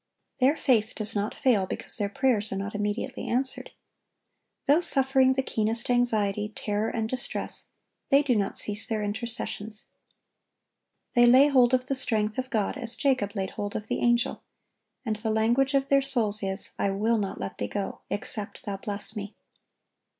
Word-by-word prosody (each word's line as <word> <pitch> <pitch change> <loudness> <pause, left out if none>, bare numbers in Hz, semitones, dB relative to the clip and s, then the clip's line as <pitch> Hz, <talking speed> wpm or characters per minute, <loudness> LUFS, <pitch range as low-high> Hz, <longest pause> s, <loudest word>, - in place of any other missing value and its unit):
(1060) - - -1
Their 265 -3 +3
faith 220 - -12
does 215 0 0
not 205 +1 -2
fail 215 -8 +1
because - - +2
their 205 -3 -1
prayers 220 -2 0
are - - -3
not 200 +1 -5
immediately 210 +5 -3
answered. 260 +2 -2 1.0
Though 295 +5 +4
suffering 265 -4 +5
the 265 0 -1
keenest 225 +1 0
anxiety, 210 -4 +1
terror, 210 +1 -2
and 225 -2 -2
distress, 250 +1 -2 0.4
they 280 +1 +5
do 260 -4 +1
not 200 -2 -1
cease 210 +1 +3
their 215 -2 -2
intercessions. 215 0 -3 1.3
They 240 0 +5
lay 260 +4 +6
hold 255 -2 +4
of 255 0 -2
the 275 - -2
strength 220 -4 +2
of 260 0 -4
God 220 0 -1
as 240 -3 -1
Jacob 255 -7 0
laid 190 -2 -3
hold 205 0 -5
of 215 - -5
the - - -1
Angel; 240 +2 +1 0.6
and 215 -2 -2
the 220 +1 -4
language 240 +6 +1
of 275 0 +1
their 275 0 +4
souls 235 -6 +1
is, 195 0 -2
"I 200 - +1
will 215 +4 0
not 195 -2 -4
let 100 - -6
Thee 105 - -2
go, 200 - -5
except 205 0 -3
Thou 200 -1 -4
bless 205 +2 -5
me." 205 0 -7
225 Hz, 175 wpm, -26 LUFS, 205-255 Hz, 1.3 s, lay